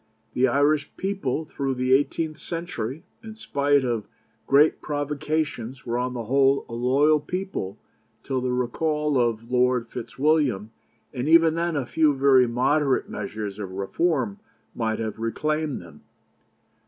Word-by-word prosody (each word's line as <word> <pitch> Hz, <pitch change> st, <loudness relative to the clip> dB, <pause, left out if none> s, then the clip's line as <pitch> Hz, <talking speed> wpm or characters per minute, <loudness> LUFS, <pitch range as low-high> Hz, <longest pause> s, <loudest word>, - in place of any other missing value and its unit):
The 130 Hz, +1 st, +3 dB
Irish 145 Hz, +3 st, +2 dB
people 190 Hz, -7 st, -2 dB
through 135 Hz, -3 st, -3 dB
the 130 Hz, +1 st, +1 dB
eighteenth 155 Hz, +3 st, +1 dB
century, 165 Hz, -5 st, -5 dB, 0.2 s
in 220 Hz, -1 st, -9 dB
spite 145 Hz, -10 st, +1 dB
of 115 Hz, -4 st, -2 dB, 0.4 s
great 145 Hz, +3 st, +4 dB
provocations, 145 Hz, -3 st, -3 dB
were 120 Hz, 0 st, -1 dB
on 125 Hz, 0 st, -2 dB
the 120 Hz, -, -3 dB
whole 135 Hz, +3 st, +3 dB
a 115 Hz, -, -9 dB
loyal 140 Hz, +6 st, +3 dB
people 165 Hz, -, -4 dB, 0.5 s
till 130 Hz, -2 st, -2 dB
the 125 Hz, -, -1 dB
recall 150 Hz, +4 st, 0 dB
of 115 Hz, 0 st, -1 dB
Lord 125 Hz, -1 st, +2 dB
Fitzwilliam, 130 Hz, -5 st, 0 dB, 0.4 s
and 130 Hz, +2 st, -2 dB
even 165 Hz, -1 st, +6 dB
then 170 Hz, 0 st, -1 dB
a 140 Hz, -3 st, -1 dB
few 150 Hz, +2 st, +2 dB
very 135 Hz, -2 st, +5 dB
moderate 135 Hz, +4 st, +1 dB
measures 105 Hz, 0 st, -5 dB
of 95 Hz, -3 st, -6 dB
reform 110 Hz, -, -1 dB, 0.3 s
might 110 Hz, -2 st, -1 dB
have 110 Hz, -1 st, -4 dB
reclaimed 150 Hz, +6 st, -1 dB
them. -, -, -15 dB
135 Hz, 140 wpm, -25 LUFS, 120-155 Hz, 0.5 s, even